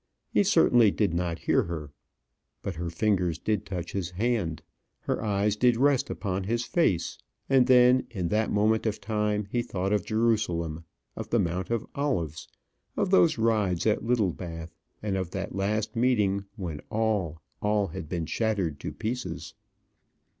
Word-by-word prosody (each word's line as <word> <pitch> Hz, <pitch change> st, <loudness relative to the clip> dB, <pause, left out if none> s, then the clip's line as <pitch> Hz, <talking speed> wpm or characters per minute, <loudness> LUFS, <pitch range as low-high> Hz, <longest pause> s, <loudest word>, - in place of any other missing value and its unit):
He -, -, +4 dB
certainly 125 Hz, -, +5 dB
did 100 Hz, -3 st, 0 dB
not 85 Hz, -1 st, -1 dB
hear -, -, +2 dB
her. 80 Hz, -4 st, -5 dB, 0.7 s
But 100 Hz, -, -3 dB
her 85 Hz, +1 st, -4 dB
fingers 90 Hz, -2 st, +1 dB
did 105 Hz, -3 st, -1 dB
touch 90 Hz, -3 st, -4 dB
his 95 Hz, -4 st, -2 dB
hand, 95 Hz, -5 st, -1 dB, 0.4 s
her -, -, -2 dB
eyes 105 Hz, -1 st, +1 dB
did 120 Hz, +1 st, +3 dB
rest 140 Hz, +1 st, +3 dB
upon 95 Hz, -2 st, -3 dB
his 115 Hz, +3 st, -1 dB
face; 95 Hz, -, +1 dB, 0.3 s
and 130 Hz, -2 st, +4 dB
then, 125 Hz, 0 st, +5 dB
in 90 Hz, -7 st, -3 dB
that 110 Hz, +1 st, +1 dB
moment 110 Hz, +2 st, +2 dB
of 110 Hz, -, -2 dB
time, 105 Hz, -1 st, -1 dB
he 120 Hz, -, +1 dB
thought 95 Hz, -3 st, -2 dB
of 105 Hz, -3 st, +1 dB
Jerusalem, 90 Hz, -8 st, 0 dB, 0.3 s
of -, -, -6 dB
the -, -, +2 dB
Mount 90 Hz, +2 st, -1 dB
of 115 Hz, -2 st, -1 dB
Olives, 85 Hz, -, -2 dB, 0.5 s
of 185 Hz, -, 0 dB
those 170 Hz, -6 st, +5 dB
rides 105 Hz, -6 st, +1 dB
at 110 Hz, -1 st, +2 dB
Littlebath, 85 Hz, -, -1 dB, 0.3 s
and 100 Hz, -2 st, -1 dB
of 95 Hz, -2 st, -2 dB
that 95 Hz, +1 st, -4 dB
last 105 Hz, +3 st, -1 dB
meeting, 105 Hz, -5 st, +2 dB
when 85 Hz, -8 st, -5 dB
all, 105 Hz, -8 st, 0 dB, 0.2 s
all 105 Hz, -2 st, +1 dB
had 80 Hz, -1 st, -7 dB
been 85 Hz, -2 st, -2 dB
shattered 95 Hz, -8 st, -1 dB
to -, -, -5 dB
pieces. 125 Hz, +3 st, -4 dB
105 Hz, 160 wpm, -27 LUFS, 90-115 Hz, 0.7 s, certainly